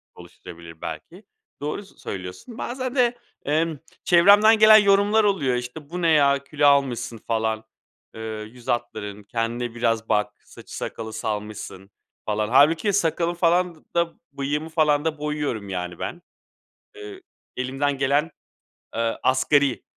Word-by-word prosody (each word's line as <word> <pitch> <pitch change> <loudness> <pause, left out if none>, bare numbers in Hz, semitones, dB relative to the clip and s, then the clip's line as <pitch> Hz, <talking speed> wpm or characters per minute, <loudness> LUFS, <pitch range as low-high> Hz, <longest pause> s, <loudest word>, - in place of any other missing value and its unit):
oluşturabilir 85 -1 -13
belki, - - -8 0.4
doğru 150 +7 -3
s 195 - -21
söylüyorsun. 95 - -8
Bazen 255 +2 -4
de, 245 -2 +2 0.3
emm, 155 +1 0 0.2
çevremden 205 +5 +6
gelen 215 0 +9
yorumlar 205 +1 +4
oluyor, 180 -12 +1
işte, 125 +5 -6
"Bu 180 +2 -5
ne 170 - +3
ya, 140 -3 +4
kilo 145 +1 +1
almışsın 125 -5 +1
falan, 110 -1 -1 0.5
eee, 110 - -8 0.3
yüz 125 -2 -16
hatların, 105 -4 -3
kendine 115 +2 -3
biraz 115 -2 0
bak. 105 -1 +1
Saçı - - -11
sakalı 110 -1 -6
salmışsın 105 -3 -5 0.3
falan." 105 0 -1
Hâlbuki 155 - +4
sakalı 170 -2 +1
falan 175 0 +1
d - - -20 0.2
da 170 -1 +1 0.2
bıyığımı 145 +3 -3
falan 150 -2 +2
da 160 -1 -1
boyuyorum, 145 -9 -3
yani, 90 -2 -5
ben, 175 - -5 0.7
eee, 415 -2 -10 0.4
elimden 135 +2 -1
gelen, 145 +4 +1 0.6
eee, 115 0 -1
asgari 130 -2 +2
140 Hz, 135 wpm, -23 LUFS, 115-170 Hz, 0.7 s, gelen